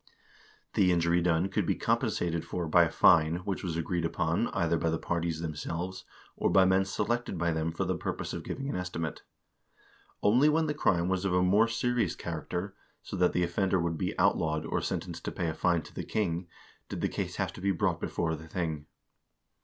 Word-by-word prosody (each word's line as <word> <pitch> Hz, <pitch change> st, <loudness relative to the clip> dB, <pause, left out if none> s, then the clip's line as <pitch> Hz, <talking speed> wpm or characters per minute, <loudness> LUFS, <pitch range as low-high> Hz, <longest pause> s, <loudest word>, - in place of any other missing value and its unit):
The 90 Hz, -2 st, +4 dB
injury 85 Hz, 0 st, +2 dB
done 85 Hz, +1 st, +2 dB
could 95 Hz, -, -1 dB
be -, -, +2 dB
compensated 85 Hz, -1 st, 0 dB
for 85 Hz, 0 st, -3 dB
by 85 Hz, +2 st, +5 dB
a -, -, -2 dB
fine, 80 Hz, +2 st, +5 dB
which 100 Hz, -2 st, -3 dB
was 85 Hz, -3 st, -2 dB
agreed 85 Hz, +1 st, -1 dB
upon, 80 Hz, -, 0 dB
either 85 Hz, 0 st, 0 dB
by 85 Hz, -, 0 dB
the 80 Hz, -, 0 dB
parties 85 Hz, -2 st, -2 dB
themselves, 85 Hz, +3 st, -4 dB, 0.3 s
or -, -, +1 dB
by 95 Hz, -1 st, +5 dB
men 95 Hz, +1 st, +3 dB
selected 120 Hz, +1 st, -1 dB
by 85 Hz, 0 st, +1 dB
them 80 Hz, 0 st, -1 dB
for 90 Hz, +4 st, -2 dB
the 95 Hz, 0 st, 0 dB
purpose 85 Hz, -, -4 dB
of -, -, -5 dB
giving 135 Hz, +1 st, -4 dB
an 140 Hz, -, -2 dB
estimate. 90 Hz, -3 st, -4 dB, 1.0 s
Only 125 Hz, +9 st, +5 dB
when 160 Hz, +1 st, +2 dB
the 150 Hz, -, -1 dB
crime 90 Hz, -, +2 dB
was 95 Hz, 0 st, 0 dB
of 95 Hz, -2 st, +1 dB
a 90 Hz, -, +3 dB
more 100 Hz, +5 st, +4 dB
serious 115 Hz, -4 st, 0 dB
character, 90 Hz, +4 st, -4 dB, 0.3 s
so -, -, -6 dB
that 90 Hz, 0 st, +3 dB
the 90 Hz, -, +2 dB
offender 95 Hz, +2 st, +1 dB
would 85 Hz, -2 st, -1 dB
be -, -, -2 dB
outlawed, 80 Hz, -1 st, +2 dB
or -, -, -1 dB
sentenced 85 Hz, -2 st, -4 dB
to -, -, -2 dB
pay 85 Hz, -3 st, -2 dB
fine 85 Hz, 0 st, +1 dB
to -, -, -14 dB
the -, -, -4 dB
king, 90 Hz, -4 st, -1 dB, 0.4 s
did -, -, -4 dB
the -, -, +2 dB
case -, -, -4 dB
have -, -, -2 dB
to -, -, -10 dB
be 100 Hz, -, +1 dB
brought 95 Hz, -, 0 dB
before 80 Hz, -1 st, -1 dB
the 80 Hz, +1 st, -11 dB
thing. 80 Hz, -3 st, -3 dB
85 Hz, 205 wpm, -30 LUFS, 80-95 Hz, 1.0 s, by